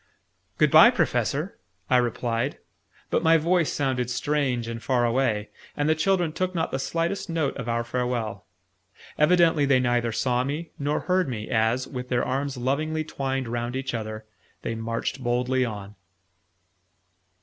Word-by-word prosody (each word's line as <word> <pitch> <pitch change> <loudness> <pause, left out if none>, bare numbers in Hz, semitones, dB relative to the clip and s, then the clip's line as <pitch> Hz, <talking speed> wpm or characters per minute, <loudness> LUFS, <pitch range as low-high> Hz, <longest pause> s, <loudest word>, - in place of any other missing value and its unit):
"Good - - +3
bye, - - +9
Professor!" - - -1 0.3
I 125 - +4
replied: 120 +1 -1 0.5
but - - +2
my 165 0 +5
voice 170 +1 +2
sounded 130 -4 -1
strange 130 -2 0
and 115 0 -5
far 125 -2 +1
away, 115 -4 0 0.3
and 145 - +1
the 155 - +4
children 175 0 +1
took 185 +2 -2
not 160 -1 -1
the 135 - -2
slightest 170 +7 -2
notice 160 -5 -1
of 120 -2 -4
our 115 0 0
farewell. 120 -3 -3 0.7
Evidently 165 -1 +4
they 135 -2 +4
neither 120 -2 +1
saw 125 +2 +1
me 150 +5 -4
nor 145 +1 0
heard 185 -3 +1
me, 110 -3 -5
as, 115 +3 +1
with 125 -1 -6
their 120 -1 +1
arms 135 +1 -2
lovingly 155 +5 -1
twined 135 -4 -3
round 120 +1 -3
each 135 -1 -3
other, 110 -1 -5 0.4
they 115 - -2
marched 115 +3 -3
boldly 125 +1 +1
on. 105 -4 -5
130 Hz, 155 wpm, -25 LUFS, 120-150 Hz, 0.7 s, bye